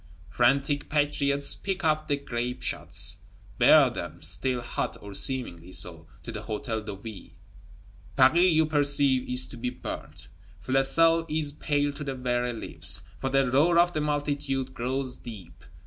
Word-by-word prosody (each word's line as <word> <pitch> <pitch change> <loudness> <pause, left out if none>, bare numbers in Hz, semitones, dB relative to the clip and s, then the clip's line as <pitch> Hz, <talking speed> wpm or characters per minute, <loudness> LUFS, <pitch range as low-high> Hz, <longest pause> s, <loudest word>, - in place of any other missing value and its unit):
Frantic 140 +4 +1
patriots 145 -1 +1
pick 195 -1 -4
up 155 -1 +1
the 145 - +1
grape 125 -2 -4
shots; 90 +5 0 0.4
bear - - +7
them, - - -7
still 110 +10 +1
hot 120 - -4
(or 100 -1 -10
seemingly 95 -8 -1
so), 90 -3 -1 0.2
to 115 - -6
the 110 - -5
Hôtel 110 +1 -4
de 105 -1 -6
Ville: 100 0 -10 0.8
Paris, 170 +8 +5
you 160 0 +3
perceive, 140 -3 +2
is 125 0 +3
to 125 - -10
be 125 +1 -2
burnt! 125 - -7 0.3
Flesselles 165 - +3
is 150 -2 -1
"pale 145 -1 -1
to 150 - -7
the 135 -2 -4
very 125 -1 -1
lips," 115 - -1 0.2
for 135 - -2
the 135 -2 +2
roar 160 +6 +4
of 175 +1 +4
the 155 - -1
multitude 145 -3 -2
grows 130 +1 -2
deep. 110 -6 -11
130 Hz, 155 wpm, -27 LUFS, 120-145 Hz, 0.8 s, bear